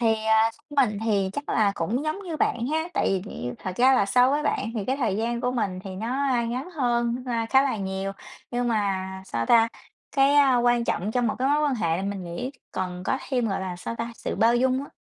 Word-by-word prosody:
Thì, 225 -2 +3
à, 220 0 +4
theo 290 -1 0
mình 210 -1 -5
thì 200 -4 +1
chắc 285 +5 -5
là 205 -2 +2
cũng 215 - -1
giống 310 +4 -2
như 340 -5 -5
bạn 235 -5 0
ha. 320 +4 -1
Tại - - +1
vì 190 -2 0
thì 125 - -5
thật 185 -1 -6
ra 260 +2 +5
là 200 - +3
so 250 +6 +4
với 295 +2 +1
bạn 220 - -1
thì 215 -4 -2
cái 260 +5 0
thời 225 -8 0
gian 235 +2 -1
của 250 - 0
mình 210 -7 -2
thì 195 - -6
nó 215 +4 -4 0.4
ngắn 255 +9 -4
hơn, 240 -6 0
a, 230 -2 -1
khá 265 +4 +5
là 270 -5 0
nhiều, 195 0 -3 0.4
nhưng 245 0 -1
mà 200 -4 0 0.2
sao 115 0 -2
ta? 230 -1 +5 0.5
Cái 275 -1 +5
quan 240 -1 +3
trọng 205 -2 -1
trong 245 -1 +1
một 215 - 0
cái 260 +2 +1
mối 295 +1 +3
quan 290 -3 +2
hệ 165 -8 0
là 185 - -3
mình 200 -1 -4
nghĩ 175 +10 -4 0.2
còn 180 -1 -4
có 265 - 0
thêm, 245 -5 0
gọi 195 - -1
là, 185 -2 -4
sao 205 - -5
ta? 235 +1 -4
Sự - - -4
bao 225 +4 +4
dung 260 +1 +2
á, - - -14
235 Hz, 245 wpm, -25 LUFS, 200-260 Hz, 0.5 s, ra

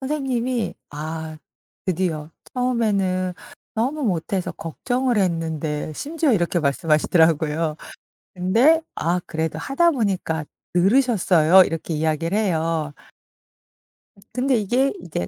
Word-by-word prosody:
선생님이 260 -4 -1 0.2
"아. 155 +1 -5 0.5
드디어. 165 -4 -2 0.2
처음에는 200 -7 0 0.4
너무 265 +7 -1
못해서 185 -1 -1
걱정을 245 +8 -1
했는데." 160 -4 -1
심지어 305 - 0
이렇게 175 -4 +1
말씀하시더라고요. 155 +1 +2 0.6
근데 230 - +4
"아 175 +2 0
그래도 160 -1 -3
하다 330 - +2
보니까 190 - -1 0.3
늘으셨어요." 190 - +5
이렇게 165 0 -3
이야기를 160 +4 0
해요. 165 -7 0 1.3
음 - - -19
근데 260 +1 +1
이게 245 +6 +1
이제 150 - -4
180 Hz, 270 characters per minute, -22 LUFS, 160-245 Hz, 1.3 s, 늘으셨어요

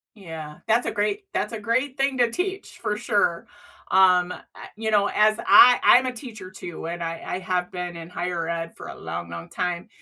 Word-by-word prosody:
Yeah, 160 -6 -9
that's 230 +2 +3
a - - 0
great 300 - -1
that's - - -2
a 225 - -5
great 255 +4 -1
thing 270 -1 0
to 240 -1 +3
teach 380 +7 -4
for 210 - -2
sure. 205 -5 0 0.4
Um, 180 -1 +4
I - - -8 0.4
you 220 0 -2
know, 205 -1 +3
as 215 +1 +4
I 245 0 +8
I'm 255 +1 +6
a 255 - -2
teacher 225 -7 -9
too, 175 -3 -8
and 170 +1 -5
I 165 0 -4
I - - -3
have 180 -1 -2
been 180 -1 -5
in 165 0 -8
higher 175 -2 -3
ed 165 0 -4
for - - -9
a - - -9
long, 85 +1 -6
long 85 0 -7
time, 180 +1 -3
185 Hz, 210 wpm, -24 LUFS, 170-230 Hz, 0.4 s, I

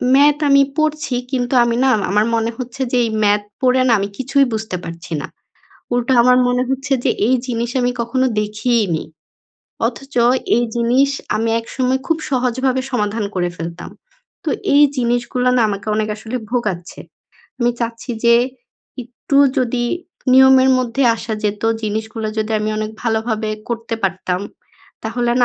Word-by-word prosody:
Math 290 +1 +5
আমি 280 0 +6 0.2
পড়ছি 305 -4 0 0.2
কিন্তু 250 0 -1
আমি 235 -1 0
না 265 - +4 0.2
আমার 210 +1 +3
মনে 230 0 0
হচ্ছে 255 +1 -6
যে 250 - +2
এই 225 - -2
ম্যাথ 205 0 +3 0.2
পড়ে 255 0 +3
না - - +4
আমি 200 - -1
কিছুই 275 +1 +2
বুঝতে 220 -3 -3
পারছি 165 0 -7
না। - - -6 0.7
উল্টো 245 +2 +1
আমার 250 +1 +5
মনে 250 0 +1
হচ্ছে 270 +1 -2
যে, - - +3 0.2
এই 260 - +4
জিনিস 235 -1 -2
আমি 245 0 +1
কখনো 255 +3 0
দেখিই 215 +2 0
নি। 160 - -2 0.8
অথচ 275 +1 -10 0.4
এই 240 - +2
জিনিস 250 +4 +3 0.3
আমি 225 +1 0
একসময় 255 +3 -1
খুব 325 -1 +1
সহজভাবে 255 0 0
সমাধান 210 -2 -1
করে 175 -1 0
ফেলতাম। 170 +1 -7 0.5
তো - - 0 0.2
এই 290 - +7
জিনিসগুলো 245 +1 0
না 235 - +4
আমাকে 200 +1 -4
অনেক 215 0 0
আসলে 225 +3 -5
ভোগাচ্ছে। 210 -8 -3 0.6
আমি 240 0 +3
চাচ্ছি 235 +2 -4
যে 235 0 +6 0.7
একটু 250 +4 -4 0.2
যদি 240 -1 0 0.5
নিয়মের 265 0 +7
মধ্যে 255 +2 -1
আসা 225 -1 -4
যেতো, 210 +1 -1 0.2
জিনিসগুলো 220 +1 -3
যদি 215 0 -1
আমি 215 0 -1
অনেক 215 0 -3
ভালোভাবে 220 -1 -1 0.2
করতে 230 -1 -3
পারতাম, 185 -1 -1 0.6
তাহলে 240 -1 -1
না - - +6
240 Hz, 155 wpm, -18 LUFS, 215-255 Hz, 0.8 s, এই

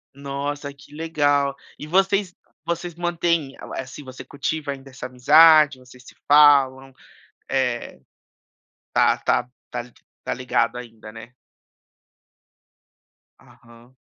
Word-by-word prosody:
Nossa, 140 +1 -5
que 140 +1 -18
legal! 145 -3 0 0.2
E 150 - -8
vocês 195 +1 +1 0.3
vocês 170 0 -4
mantêm, 170 -4 -1 0.2
assim, 130 +2 -7
você 130 -1 -11
cultiva 145 +1 -4
ainda 135 0 -9
essa 135 - -9
amizade, 150 +3 +6
vocês 125 0 -17
se - - -16
falam? 135 -3 +5 0.6
Eh, 125 - -2 0.9
tá - - +3
tá - - 0 0.2
tá 120 +1 -6 0.3
tá - - -2
ligado 125 -1 -1
ainda, 115 -3 -10
né? 115 +2 -12 2.1
Aham. 120 +2 -20
140 Hz, 105 wpm, -22 LUFS, 125-155 Hz, 2.1 s, amizade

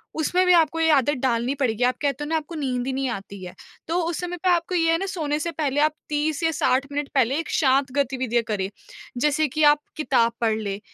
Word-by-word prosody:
उसमें 355 +4 +1
भी 360 - +5
आपको 325 -1 +3
ये 325 0 +3
आदत 290 0 +3
डालनी 240 +1 +1
पड़ेगी, 250 -4 -1
आप 250 +1 +2
कहते 285 0 -1
हो - - -5
ना 325 - 0
आपको 315 +2 -6
नींद 255 -5 -2
ही - - 0
नहीं 265 0 -1
आती 200 -3 -7
है, 180 - -8 0.3
तो 335 +2 0
उस 335 -1 -3
समय 355 0 -4
पे 370 - +3
आपको 350 +1 +1
ये 330 -1 +3
है 330 - +3
ना 390 - -3
सोने 310 -6 -2
से 335 +2 -3
पहले 290 -3 -1
आप 305 +1 +3 0.2
30 300 +1 -1
या 325 - +2
60 270 -3 +1
मिनट 290 0 -3
पहले 265 0 +3
एक 330 - -5
शाँत 270 -2 +2
गतिविधियाँ 255 -4 0
करें। 195 -3 -2 0.5
जैसे 300 +4 +2
कि 305 +4 -1
आप 295 0 +6 0.2
किताब 255 -6 +2
पढ़ 225 -2 +2
लें 200 -2 -4
290 Hz, 240 wpm, -23 LUFS, 255-320 Hz, 0.5 s, आप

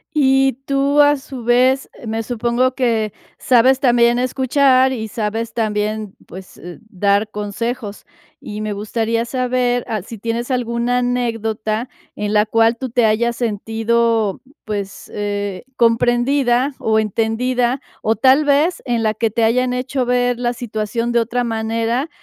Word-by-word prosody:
Y 270 -2 +3
tú, 280 +1 +2
a 290 0 +4
su 265 -3 -9
vez, 255 +3 +3
eh, 235 - -11
me 225 +1 -2
supongo 240 +2 0
que 230 -5 0 0.2
sabes 255 +1 +4
también 240 -3 +3
escuchar 260 +1 +3
y 225 -4 -4
sabes 225 +1 -3
también, 215 -2 -2
pues, 185 +1 -12
eh 175 0 -10
dar 200 +1 +1
consejos, 210 +1 -5 0.4
y 210 0 -6
me 215 -1 -3
gustaría 225 +3 -1
saber 250 -1 0
al 215 -5 -3
si 230 - -9
tienes 230 +4 -3
alguna 240 0 0
anécdota 225 -2 -2 0.3
en 210 0 -3
la 210 0 +4
cual 225 +1 +3
tú 260 +1 -5
te 240 0 +2
hayas 235 +2 +1
sentido, 225 -1 0 0.2
pues, 200 -2 -5
eh, 205 -2 -3
comprendida 245 +3 +2
o 220 0 +1
entendida, 240 +4 0 0.2
o 220 +1 +1
tal 265 +6 +4
vez 290 +5 +2
en 235 -2 0
la 215 -1 +1
que 225 +1 0
te 225 +2 -1
hayan 250 +2 +2
hecho 255 +1 -2
ver 245 0 +1
la 240 0 0
situación 230 0 -3
de 235 - +3
otra 240 +2 -1
manera 230 +4 -1
235 Hz, 150 wpm, -18 LUFS, 220-250 Hz, 0.4 s, a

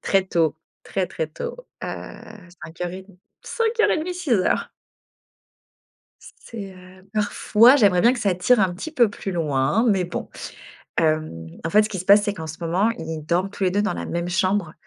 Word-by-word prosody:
Très 195 -1 +2
tôt 165 -5 +1 0.3
très 190 -2 -2
très 160 -1 -4
tôt, 155 - -6 0.3
heu, - - -4 0.8
05:30, 180 +3 -7 0.2
05:30-06:00. 360 - 0 1.5
C - - -14
c'est 200 -4 -8
heu, 185 +1 -16
parfois, 215 +3 +4
j'aimerais 200 -8 +4
bien 240 +6 +5
que 260 - -4
ça 200 -4 +1
tire 230 +6 +3
un 190 -2 +2
petit 250 - -6
peu 240 -7 +4
plus 195 -1 -5
loin, 155 - +1
mais 195 -4 +2
bon. 175 - -5 0.7
Hem, 155 - 0 0.2
en 165 - -1
fait, 210 +4 +5
ce 210 - -2
qui 195 - -5
se 180 - -5
passe, 200 +2 +6
c'est 205 0 -1
qu'en 160 -3 -7
ce 160 +1 -7
moment, 180 +6 +1
ils 160 -1 -6
dorment 175 +4 0
tous 200 - -3
les 185 - +3
2 200 +3 +1
dans 210 - 0
la - - -5
même 170 0 -3
chambre, 185 -2 0
190 Hz, 180 wpm, -23 LUFS, 170-210 Hz, 1.5 s, passe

